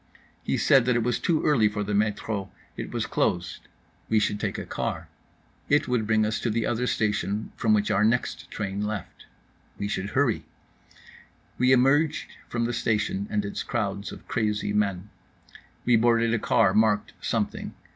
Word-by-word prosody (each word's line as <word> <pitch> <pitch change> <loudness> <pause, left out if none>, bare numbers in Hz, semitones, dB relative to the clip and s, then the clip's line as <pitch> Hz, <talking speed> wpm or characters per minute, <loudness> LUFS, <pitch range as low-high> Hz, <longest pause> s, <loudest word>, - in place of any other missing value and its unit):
He - - 0
said 135 -3 +5
that 125 -1 +2
it 120 - +2
was 125 +1 0
too 165 -3 +1
early 130 -8 +4
for 105 0 -3
the 105 +1 -3
metro, 105 -1 -1 0.3
it - - -5
was - - -2
closed. 85 -1 -1 0.4
We 110 - +3
should 105 -1 +1
take - - -2
a - - -5
car. - - -4 0.6
It 145 +1 +3
would 120 -4 0
bring 110 -1 +3
us 110 - -1
to 120 - -1
the 115 +1 0
other 120 +1 0
station 105 -1 -1
from 110 -2 +3
which 105 0 +1
our 100 - +3
next 120 +3 0
train 100 -1 -3
left. 105 -2 -5 0.5
We 100 - -2
should 100 -1 -3
hurry. 135 -6 +2 1.2
We 125 +1 +4
emerged 145 +5 +3 0.2
from 120 -1 -1
the 120 - -2
station 105 -3 0
and 105 -1 -1
its 100 - -4
crowds 100 -3 -3
of - - -11
crazy 105 -2 -1
men. 100 -1 -1 0.7
We 120 -1 +5
boarded 115 0 +3
a 115 - +1
car 95 -2 +3
marked 105 -1 +2
something. - - -2
110 Hz, 175 wpm, -26 LUFS, 105-120 Hz, 1.2 s, said